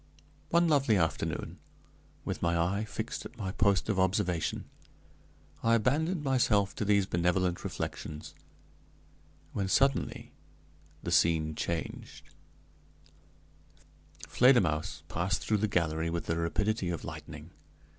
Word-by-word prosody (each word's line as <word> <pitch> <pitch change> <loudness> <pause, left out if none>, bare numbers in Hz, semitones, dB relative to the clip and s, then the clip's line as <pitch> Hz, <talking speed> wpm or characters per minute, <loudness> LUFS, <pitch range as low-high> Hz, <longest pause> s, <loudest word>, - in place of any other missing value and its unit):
One 170 0 +4
lovely 140 -8 +3
afternoon, 80 -3 -2 0.7
with - - -3
my 85 0 +1
eye 95 +6 0
fixed 110 +2 -5
at - - -11
my 95 -4 -3
post 100 -1 +2
of 105 -3 0
observation, 95 -3 0 1.0
I 115 0 +4
abandoned 150 - +1
myself 115 -7 +2
to 105 - -1
these 100 -1 +3
benevolent 90 0 0
reflections, 75 0 -5 1.2
when 100 -2 -1
suddenly 135 +8 +1 0.7
the - - -3
scene 80 -2 +3
changed: 85 +2 -5 2.0
Fledermausse 95 - +3
passed 90 +3 -1
through 110 - +2
the 110 +2 +1
gallery 85 -4 0
with 85 0 -3
the 80 - -1
rapidity 95 +4 0
of 85 -3 -4
lightning. - - -8
95 Hz, 115 wpm, -30 LUFS, 85-110 Hz, 2.0 s, One